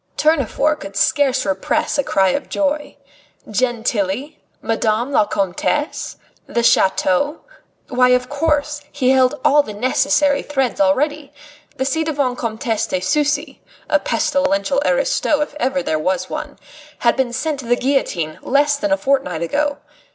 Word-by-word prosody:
Tournefort 300 0 +1
could 195 0 -9
scarce 270 +3 +2
repress 200 +11 -1
a - - +3
cry 190 -5 +2
of 285 +10 -2
joy. 295 0 -2 0.5
"Gentilly? 235 +1 -1 0.2
Madame 225 +3 0
la 215 - +3
Comtesse? 200 - -2 0.3
The 235 - -1
chateau?" 195 - +2 0.5
Why, 250 0 +3
of 250 0 +2
course, 295 0 -1
he 260 -3 +1
held 265 +2 +3
all 295 +1 +6
the 215 -7 -8
necessary 280 +5 +2
threads 270 -1 -1
already. 290 0 +1 0.5
The 265 - -1
ci 320 +4 0
devant 280 -5 -1
Comte 220 -2 -4
de 225 -6 -1
Sucy 290 - -1 0.3
a - - +4
pestilential 295 - 0
aristo - - +1
if 295 - -3
ever 265 +1 0
there 155 - -1
was 185 +3 -1
one! - - -6 0.5
had 235 - +4
been 260 -2 0
sent 290 +4 -2
to 250 - -8
the 245 - +3
guillotine 245 - -1
less 285 +2 +2
than 305 +1 -2
a 295 - +4
fortnight 225 - 0
ago. 290 - -1
270 Hz, 145 wpm, -19 LUFS, 230-295 Hz, 0.5 s, all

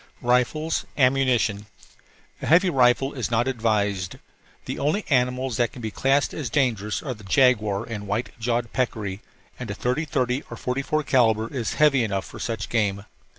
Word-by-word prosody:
RIFLES 125 +6 +1
AMMUNITION 125 -6 +2 0.7
A - - -4
heavy 180 +3 +5
rifle 130 +1 +3
is 125 -5 -3
not 120 +2 +1
advised. 105 -6 0 0.5
The - - -4
only 155 +9 0
animals 125 -1 +1
that 120 -2 +1
can 135 - -11
be 110 - -3
classed 135 +5 +1
as 145 -7 -4
dangerous 110 -5 0
are 135 -5 -3
the 110 -3 -14
jaguar 105 -2 +3
and 110 -3 -6
white 105 +5 -2
jawed 120 0 -1
peccary, 105 -6 -2 0.4
and 125 -3 -6
a 100 - -3
30 125 +8 -1
30 130 -2 -1
or - - -7
44 140 +4 -1
calibre 115 -5 +3
is 120 -6 -3
heavy 145 -4 +4
enough 100 -3 -2
for - - -11
such 115 -1 -3
game. 100 -3 0
125 Hz, 165 wpm, -24 LUFS, 110-135 Hz, 0.7 s, heavy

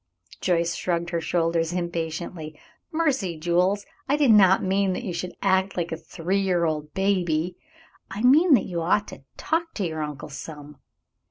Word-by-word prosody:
Joyce 170 -2 +1
shrugged 170 -1 -2
her 170 -1 -1
shoulders 165 0 0
impatiently. 165 -2 -4 0.3
"Mercy, 270 - 0
Jules, 180 +5 +1 0.2
I 285 - +3
did 285 -5 +4
not 195 -3 +6
mean 190 0 +1
that 185 - -4
you 190 -7 -4
should 180 +1 -5
act 190 -1 +2
like 170 -1 -2
a - - -1
three 170 +4 -2
year 180 -3 +1
old 150 -1 -2
baby. 180 -3 0 0.5
I 200 +4 -5
meant 295 +5 +6
that - - +1
you 170 -2 -3
ought 195 +5 +1
to - - -11 0.2
talk 325 +1 +1
up 330 - -39
to 200 - -1
your 160 -2 -3
uncle 150 0 -6
some. 145 +1 -9
175 Hz, 175 wpm, -25 LUFS, 165-195 Hz, 0.5 s, not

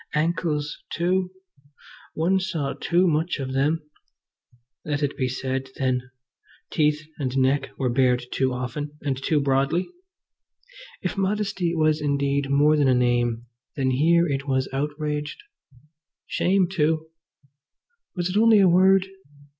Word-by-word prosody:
Ankles 150 -2 -1 0.2
also! 180 +2 +1 0.9
One 180 +4 +2
saw 160 -7 -2
too 180 +2 +1
much 165 +2 0
of 130 -2 -4
them. 150 +4 +1 1.0
Let 145 -1 -2
it 145 - -1
be 130 - -1
said 130 +1 -3
then. 130 -1 -1 0.6
Teeth 150 -1 +1 0.2
and 130 -2 -2
neck 135 +2 +2
were 130 - -1
bared 125 -1 +2
too 130 -1 0
often 135 +4 -5
and 140 -2 0
too 155 - +2
broadly. 140 +5 +1 1.2
If - - -3
modesty 195 -3 -1
was 155 -1 +2
indeed 140 -1 0
more 145 +2 +4
than 145 -2 +3
a 130 - +4
name, 120 -1 +1 0.3
then 130 -2 0
here 165 +6 +3
it 140 -3 -3
was 130 -1 0
outraged. 150 - -3 0.8
Shame 185 0 +1
too! 160 -2 0 1.0
was 175 -2 -1
it 185 +2 -2
only 225 0 +6
a 195 - +6
word? 190 +2 +5
150 Hz, 130 wpm, -24 LUFS, 135-170 Hz, 1.2 s, only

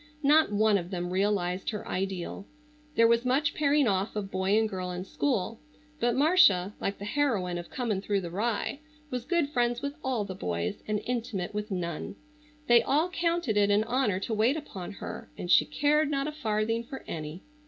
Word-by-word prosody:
Not 300 -1 +5
one 210 0 +3
of 175 0 -7
them 175 -2 -3
realized 190 -2 0
her 210 -2 -5
ideal. 190 +1 -3 0.5
There 230 - +6
was 235 +1 +3
much 275 +5 +1
pairing 290 -2 +3
off 195 +1 0
of 200 -2 -3
boy 190 +2 +2
and 220 0 +3
girl 185 -3 -4
in 180 +1 -5
school, 230 -2 -1 0.4
but 240 0 +1
Marcia, 280 - +5
like 200 - -2
the 200 - -7
heroine 205 -9 0
of 175 - -9
"Comin' 230 -7 -2
thro' 200 0 0
the 175 -3 -6
Rye," 220 +7 -1 0.3
was 250 -1 -3
good 340 -4 +1
friends 240 -2 0
with 280 0 -2
all 250 -6 0
the 190 - -5
boys 85 - -3
and 210 -1 0
intimate 225 -7 -3
with 210 +1 -3
none. 175 -2 -4 0.5
They 240 -3 +6
all 310 +6 +1
counted 335 - 0
it 205 0 +4
an 205 +1 +4
honor 230 -5 0
to 225 - -2
wait 225 +7 +2
upon 200 - -7
her, - - -7
and 175 - -3
she - - +6
cared 300 +1 +2
not 275 -2 0
a - - -2
farthing 225 -4 -1
for 265 +3 -8
any. 155 +2 -6
215 Hz, 195 wpm, -29 LUFS, 190-265 Hz, 0.5 s, There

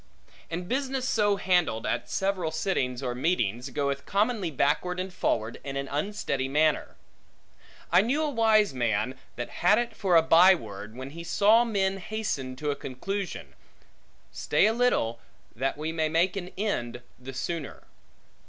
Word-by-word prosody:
And 175 +2 -4
business 265 +1 -1
so 205 -4 +2
handled, 180 - +1
at 120 - -2
several 190 -4 -1
sittings 140 -7 -1
or 125 -1 -1
meetings, 125 - -1
goeth 140 0 -2
commonly 205 -2 +1
backward 160 +5 0
and 185 0 -4
forward 110 -8 -1
in 135 -1 -5
an 140 0 -3
unsteady 145 -4 -2
manner. 150 +2 +1 1.0
I - - +6
knew 270 +9 0
a 305 - 0
wise 220 - +3
man 115 -1 0 0.2
that 120 - -5
had 180 +5 +5
it 235 -1 -2
for 190 -5 +1
a 165 - +7
byword, 160 - +3
when 130 +2 -7
he 170 +2 -8
saw 210 +7 +4
men 195 -4 0
hasten 185 -11 -4
to 150 +2 -2
a - - -2
conclusion, 180 +9 -5 0.8
Stay - - +2
a 220 - +3
little, 225 - +1 0.4
that 135 +4 -1
we 155 +2 -3
may 160 -1 0
make 170 +4 +2
an 180 -2 -4
end 120 - -2 0.2
the 130 +1 -8
sooner. 160 +1 -4
165 Hz, 155 wpm, -27 LUFS, 135-200 Hz, 1.0 s, a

